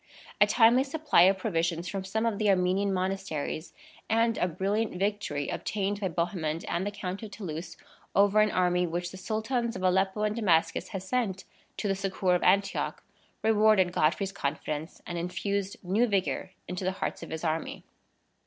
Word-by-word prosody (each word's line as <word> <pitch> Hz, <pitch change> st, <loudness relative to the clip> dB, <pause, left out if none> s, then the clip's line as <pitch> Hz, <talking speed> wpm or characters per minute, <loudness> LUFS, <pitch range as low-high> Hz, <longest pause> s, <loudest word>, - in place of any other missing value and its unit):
A 205 Hz, -, +8 dB
timely 235 Hz, +4 st, +5 dB
supply 295 Hz, -, +2 dB
of 195 Hz, -, +1 dB
provisions 170 Hz, -3 st, -1 dB
from 195 Hz, +1 st, -3 dB
some 220 Hz, +4 st, -1 dB
of 220 Hz, -3 st, 0 dB
the 215 Hz, -1 st, +2 dB
Armenian 190 Hz, +1 st, +2 dB
monasteries, 185 Hz, -4 st, -2 dB, 0.4 s
and 230 Hz, +1 st, +3 dB
a 180 Hz, -, +2 dB
brilliant 195 Hz, +5 st, -1 dB
victory 200 Hz, -7 st, -1 dB
obtained 200 Hz, 0 st, -2 dB
by 200 Hz, -, 0 dB
Bohemond 170 Hz, -2 st, -2 dB
and 175 Hz, +4 st, -1 dB
the -, -, -2 dB
Count 190 Hz, -1 st, -5 dB
of 220 Hz, -, -7 dB
Toulouse 170 Hz, -5 st, -6 dB, 0.4 s
over 200 Hz, +1 st, +5 dB
an 215 Hz, -, +4 dB
army 180 Hz, -1 st, +2 dB
which 175 Hz, +1 st, -3 dB
the 190 Hz, -, -9 dB
Sultans 230 Hz, +4 st, -2 dB
of -, -, -5 dB
Aleppo 190 Hz, +3 st, +2 dB
and 210 Hz, 0 st, 0 dB
Damascus 180 Hz, -8 st, +2 dB
had 195 Hz, -3 st, -5 dB
sent 195 Hz, -3 st, -1 dB, 0.3 s
to 210 Hz, -, -2 dB
the 195 Hz, -, +2 dB
succor 190 Hz, -1 st, 0 dB
of 180 Hz, -, +2 dB
Antioch, 200 Hz, 0 st, +1 dB, 0.4 s
rewarded 215 Hz, -4 st, +4 dB
Godfrey's 185 Hz, +6 st, +1 dB
confidence 155 Hz, -2 st, -4 dB
and 175 Hz, -1 st, -4 dB
infused 195 Hz, +3 st, -2 dB
new 205 Hz, +7 st, +2 dB
vigor 190 Hz, -2 st, -1 dB, 0.2 s
into 180 Hz, +1 st, -4 dB
the 185 Hz, +1 st, 0 dB
hearts -, -, -4 dB
of -, -, -8 dB
his 160 Hz, 0 st, -5 dB
army. 160 Hz, 0 st, -2 dB
190 Hz, 170 wpm, -29 LUFS, 180-210 Hz, 0.4 s, A